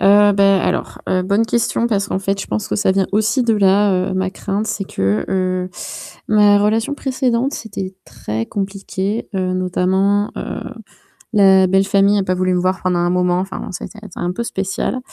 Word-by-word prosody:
Heu, 205 +1 +6
bah, 195 -1 +4
alors, - - -2
heu, 185 0 +1
bonne 200 +4 +1
question 235 0 0
parce 205 -3 0
qu'en - - -1
fait 195 +1 -2
je - - -5
pense 210 - -2
que - - -2
ça 200 - +2
vient 190 0 +1
aussi 220 +5 +2
de 225 - +3
là, 195 -2 +3
heu, - - -3
ma 185 0 0
crainte, 200 +2 -3
c'est 205 - -2
que, 100 - -1
heu, 185 -1 -1 0.6
ma 210 -1 +5
relation 220 +6 +1
précédente, 260 -1 -1
c'était 195 -4 -6
très 115 -2 -4
compliqué, 195 - -4
heu, 185 -1 -1
notamment, 190 +3 +1
heu, - - -5 0.7
la 190 -3 +5
belle 190 +1 +3
famille 200 0 +3
a - - +1
pas 185 - 0
voulu 185 0 0
me 180 - +1
voir 185 0 -1
pendant 180 -1 +1
un 175 0 +1
moment, 180 0 +1
enfin 190 +1 -5
c'était 210 +4 -8 0.2
un 175 - -2
peu 210 - -4
spécial. 195 +3 -2
195 Hz, 190 wpm, -18 LUFS, 185-210 Hz, 0.7 s, Heu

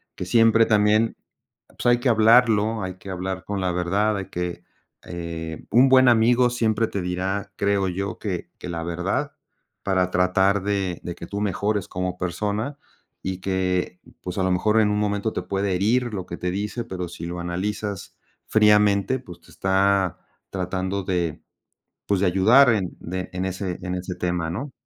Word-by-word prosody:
que - - -5
siempre 115 +3 +5
también, 105 +1 +3 0.5
pues - - -10
hay 120 0 +4
que 125 - +1
hablarlo, 110 -1 +4
hay 95 -1 -5
que 95 - -11
hablar 95 0 -4
con 100 -1 -3
la 90 -1 0
verdad, 100 +5 0
hay 95 - -4
que, 90 0 -4 0.4
eh 85 -2 -6
un 125 +4 +6
buen 130 -1 +6
amigo 120 +2 +4
siempre 115 -2 +1
te 100 - -3
dirá, 95 +3 -3
creo 100 -1 +1
yo, 95 +1 -3
que 90 -5 -4
que - - -8
la 85 -1 -4
verdad 85 +1 -2 0.5
para 95 -2 +1
tratar 95 +2 +2
de 100 -3 -1
de 85 - -5
que 85 - -9
tú 100 0 -4
mejores 105 0 -1
como 90 0 -3
persona 105 +9 -2 0.5
y 95 -1 -3
que, 90 -1 -1 0.2
pues 90 +1 -6
a - - +1
lo 95 - +1
mejor 105 +5 +2
en 105 - +3
un 105 - 0
momento 105 +1 0
te - - -2
puede 100 -1 -1
herir 115 +5 +1
lo 95 -3 -4
que 85 - -6
te 90 - -2
dice, 105 +5 -3
pero 90 -5 -5
si 85 -1 -8
lo 90 0 -5
analizas 95 +3 -4 0.3
fríamente, 105 +2 +4
pues 90 -9 -13
te - - -19
está 95 -1 +1 0.3
tratando 95 +1 -2
de 90 -3 -2 0.7
pues 100 -2 +1
de 100 - +2
ayudar 110 +9 +6
en 95 -5 -3
de 90 +2 -5
en 90 0 -3
ese 95 -1 -3
en 90 0 -3
ese 90 0 -5
tema, 90 -2 -2
¿no? 130 - -5
95 Hz, 180 wpm, -23 LUFS, 90-105 Hz, 0.7 s, un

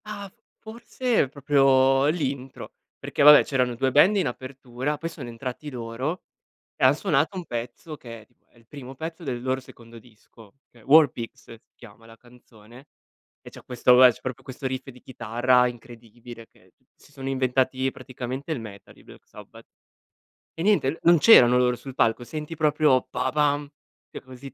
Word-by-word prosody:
Ah, 210 -1 -7
f - - -36 0.3
forse 230 - -2
proprio 135 -1 +2
l'intro, 140 -5 -4 0.3
perché - - -4
vabbè 150 0 +9
c'erano 125 -3 -1
2 130 +2 -1
band 180 +10 +4
in 185 - 0
apertura, 130 +2 -6
poi 165 +3 -5
sono 150 -7 -10
entrati 125 +5 -7
loro 125 +7 -5 0.6
e - - 0
han 130 +2 +5
suonato 160 +1 -1
un 180 - -5
pezzo, 125 +7 -7
che 115 -4 -11
è - - -22
tipo 120 - -40
è - - -27
il 115 - -25
primo 135 0 -11
pezzo 160 +4 -8
del 125 -4 -4
loro 130 +1 -2
secondo 115 -2 -15
disco, 110 -1 -20
che 120 - -21
è - - -21
"War 155 +1 +6
pigs" 115 -1 -9
si 115 - -14
chiama 115 -1 -17
la 115 0 -16
canzone 120 +1 -19 0.5
e - - -13
c'è - - -15
questo, 125 0 +2
vabbè, 125 0 +7
c'è - - -18
proprio 130 -2 -7
questo 135 +1 -7
riff 130 +1 -5
di 125 -1 -17
chitarra 125 +1 +1
incredibile 120 -1 -11
che - - -27
t - - -41
si - - -23
sono 135 0 -7
inventati 130 0 0
praticamente 130 +4 -7
il 140 - -4
metal 100 -3 -12
i - - -21
Black - - -17
Sabbath. - - -15 0.9
E 165 - -6
niente, 170 -7 +1
non 170 0 +5
c'erano 125 - +7
loro 125 -1 +1
sul 135 +1 -11
palco, 115 0 0
senti 155 +4 -7
proprio 150 -4 +2
"pa 125 +1 -2
pam" 145 0 0 0.4
che - - -9
così 130 +1 -12
130 Hz, 185 wpm, -24 LUFS, 120-145 Hz, 0.9 s, vabbè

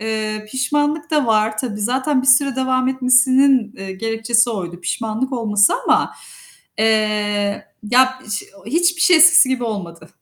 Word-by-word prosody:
eee, 215 -1 -4
pişmanlık 290 +4 -2
da 300 -4 0
var 215 -1 0
tabii. 215 -3 -4
Zaten 260 +5 -1
bir - - -6
süre 270 0 +3
devam 260 -1 0
etmesinin, 260 -2 +2
eee, 195 0 -8
gerekçesi 225 +4 0
oydu. 175 -5 -6
Pişmanlık 225 +7 -4
olması 215 -4 +2
ama, - - +1 0.6
eee, 210 -2 -1 0.2
ya, 260 +1 +3
iş 210 0 -3
e - - -17
o 195 - -19
hiçbir 345 +2 0
şey 360 0 +5
eskisi 315 -4 +6
gibi 260 -2 -2
olmadı. 185 -7 -7
240 Hz, 155 wpm, -18 LUFS, 215-260 Hz, 0.6 s, eskisi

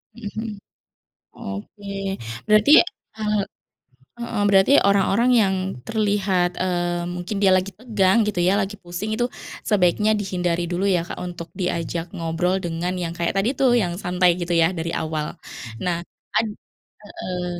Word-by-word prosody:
Heeh 230 -3 -6
heeh. 220 0 -3 0.8
Oke, 100 - -8 0.6
berarti 215 +6 +5 0.5
e 220 - -8 1.0
heeh, 235 -3 -2
berarti 195 +5 +5 0.2
orang-orang 200 +4 +3
yang 190 -2 +2 0.3
terlihat 200 -4 +1
e - - +1 0.5
mungkin 180 +4 -4
dia 195 -2 +5
lagi 185 +2 -2
tegang 215 -5 +2
gitu, 205 -4 -1
ya, 190 - +4
lagi 195 +1 -3
pusing 175 +4 -5
itu 240 +2 +1 0.4
sebaiknya 210 +1 +3
dihindari 180 -3 -1
dulu, 175 +2 -1
ya, - - +2
Kak, - - -6
untuk 175 -2 -7
diajak 170 -2 -2
ngobrol 170 +2 0
dengan 170 +1 -2
yang 165 0 -3
kayak 170 -1 0
tadi, 195 +5 +2
tuh, 265 -2 +4
yang 175 -2 -1
santai 180 0 +3
gitu, 175 0 -3
ya, 165 - +5
dari 165 +1 -2
awal. 155 -1 -2 0.6
Nah 180 -2 0 0.4
ad 225 - +2 0.6
heeh. 180 -3 -5
185 Hz, 145 wpm, -23 LUFS, 175-210 Hz, 1.0 s, berarti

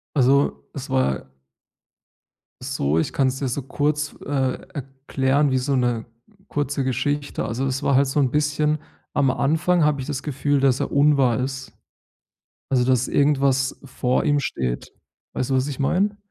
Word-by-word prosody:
Also, 140 +1 +2
es 135 -1 -7
war 65 - 0 1.3
so, 80 - 0
ich - - -1
kann's 135 -1 0
dir 140 - -1
so 130 +2 -3
kurz, 150 +2 -1
äh, 135 -2 0 0.2
erklären 135 0 0
wie 130 - +1
so 135 +2 0
'ne 120 -3 0 0.4
kurze 145 -1 -1
Geschichte. 140 +3 -1
Also, 125 +4 -2
es 135 0 -1
war 140 - +2
halt 140 +2 +5
so 135 +3 0
'n 135 -3 +3
bisschen 150 +2 +1 0.4
am 140 -2 +3
Anfang 160 +6 +2
habe 150 -2 +2
ich 130 - -4
das 145 -2 -3
Gefühl, 145 0 0
dass 135 -2 +3
er - - -1
unwahr 140 -4 +3
ist, 135 +1 -4 1.0
also 130 -2 +3
dass 130 0 +2
irgendwas 135 -2 +2
vor 130 +3 0
ihm 145 -1 +2
steht. 65 - -3 0.4
Weißt 130 - -2
du, - - +2
was 130 0 +2
ich 140 - -5
meine? 190 +9 +1
135 Hz, 160 wpm, -23 LUFS, 130-145 Hz, 1.3 s, halt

